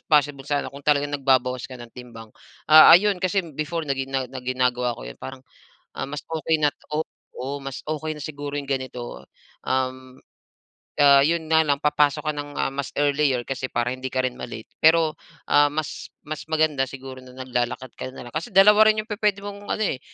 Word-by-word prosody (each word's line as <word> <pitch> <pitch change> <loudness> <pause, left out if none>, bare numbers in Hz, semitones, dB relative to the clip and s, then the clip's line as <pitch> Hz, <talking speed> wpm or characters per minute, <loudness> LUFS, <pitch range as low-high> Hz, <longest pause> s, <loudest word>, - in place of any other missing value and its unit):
possible 145 -2 +2
sana, 145 -1 -1
kung 140 - -10
talagang 145 0 +1
nagbabawas 130 -3 +1
ka 130 - -9
ng 120 -2 -12
timbang. 115 -3 -11 0.3
Ah, 155 0 +9
ayun 200 0 +1
kasi 185 +1 0
before 155 +3 -3
na 140 - -1
ginaga 135 -1 -2
na 130 - -6
ginagawa 125 -1 0
ko - - -9
'yon, - - -10
parang, 130 0 -9 0.5
ah, - - -2
mas 145 +2 -6
okey 160 -1 0
na 150 - +4 0.2
oo, 155 - +1 0.3
oo, 135 +3 -5
mas 135 -1 -7
okey 155 0 -2
na 150 - -10
siguro 145 -1 -6
yong 140 - -12
ganito. 125 - -5 0.4
Um, 130 0 -3 0.8
ah 140 -1 +7
'yon 160 0 0
nga 160 0 +5
lang 140 -1 +1
papasok 150 0 +2
ka - - -10
ng 145 0 -6 0.3
mas 140 -2 -3
earlier, 140 -3 +2
kasi 130 -1 -3
para 120 +1 0
hindi 130 0 -5
ka 130 0 0
rin 125 - -7
ma-late. 110 -2 -8
Pero, 160 -1 +5 0.3
ah, 145 0 +5
mas 155 0 -5
mas 155 0 -5
maganda 155 -3 +2
siguro 130 -1 -9
na 125 - -14
naglalakad 125 0 -3
ka 130 - -5
na 125 - -9
lang. 120 - -13
Kasi 165 +10 -3
dalawa 210 +3 +7
rin 215 0 +2
yong 220 - -28
pupuwede 210 -1 0
mong 205 0 -8
ano 215 - 0
eh 130 - -2
140 Hz, 195 wpm, -24 LUFS, 130-155 Hz, 0.8 s, Ah